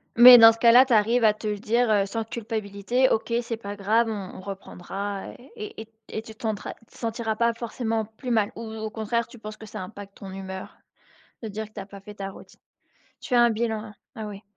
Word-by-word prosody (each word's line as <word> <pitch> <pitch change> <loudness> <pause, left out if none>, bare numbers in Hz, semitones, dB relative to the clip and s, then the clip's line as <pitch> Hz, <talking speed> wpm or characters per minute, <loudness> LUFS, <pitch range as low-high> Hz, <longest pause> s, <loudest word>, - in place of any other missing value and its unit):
Mais 245 +1 +11
dans 225 -1 +10
ce 225 - -8
cas-là, 240 +3 +7
tu 260 - 0
arrives 230 +3 +3
à 215 -1 +6
te 215 +1 -7
le 210 -1 -1
dire, 230 +3 +1
heu, 205 -2 +3
sans 225 +3 -3
culpabilité: 220 +2 -1
«OK 225 +1 0
c'est 230 -1 -4
pas 205 -2 -7
grave, 215 +4 +2
on 200 -4 -5
on - - -9
reprendra» 195 +1 -6 0.3
et 425 - -7
et 220 - -10 0.2
et 220 - -4
tu 220 -1 -12
te - - -20
sentra 215 -3 -3
tu - - -25
te - - -20
sentiras 225 -1 -2
pas 235 +1 +2
forcément 225 -1 -2
plus 220 +4 -9
mal 220 -4 +2
ou - - -7
ou 220 -1 -7
au 220 0 -4
contraire, 225 +2 -1
tu 240 - -14
penses 215 0 -8
que 220 - -11
ça 200 - -7
impacte 200 +1 -10
ton 195 -1 -9
humeur 190 0 -8 0.7
de - - -3
te - - -8
dire 220 +2 -4
que 215 - -25
tu - - -7
as - - -8
pas 200 0 -12
fait 210 +2 -11
ta 195 -1 -5
routine? 195 - -14 0.6
Tu 250 - -3
as 240 - +6
un 235 - +5
bilan, 225 0 -1
hein. 215 -1 -11 0.2
Ah, 220 -3 -6
oui. 205 0 -8
220 Hz, 250 wpm, -25 LUFS, 205-230 Hz, 0.7 s, Mais